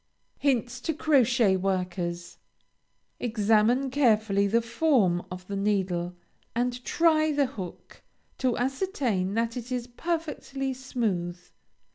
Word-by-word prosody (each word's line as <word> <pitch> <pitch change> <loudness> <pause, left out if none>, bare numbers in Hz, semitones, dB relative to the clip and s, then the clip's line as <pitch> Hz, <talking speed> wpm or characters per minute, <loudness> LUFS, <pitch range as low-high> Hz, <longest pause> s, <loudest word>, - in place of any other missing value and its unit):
HINTS 255 -2 0
TO 320 +2 -2
CROCHET 245 -9 +3
WORKERS. 180 -2 -2 0.8
Examine 225 +3 +2
carefully 215 -7 +3
the 230 +4 +3
form 230 - +2
of 180 0 -8
the 200 - -5
needle, 190 -3 0 0.4
and 245 +1 -1
try 315 0 +3
the 285 -1 +2
hook, 190 -8 -9 0.4
to 255 -2 +1
ascertain 250 - -1
that 230 0 0
it 245 0 -6
is 250 -2 -2
perfectly 275 -1 -3
smooth. 215 -10 -2
235 Hz, 110 wpm, -27 LUFS, 195-265 Hz, 0.8 s, CROCHET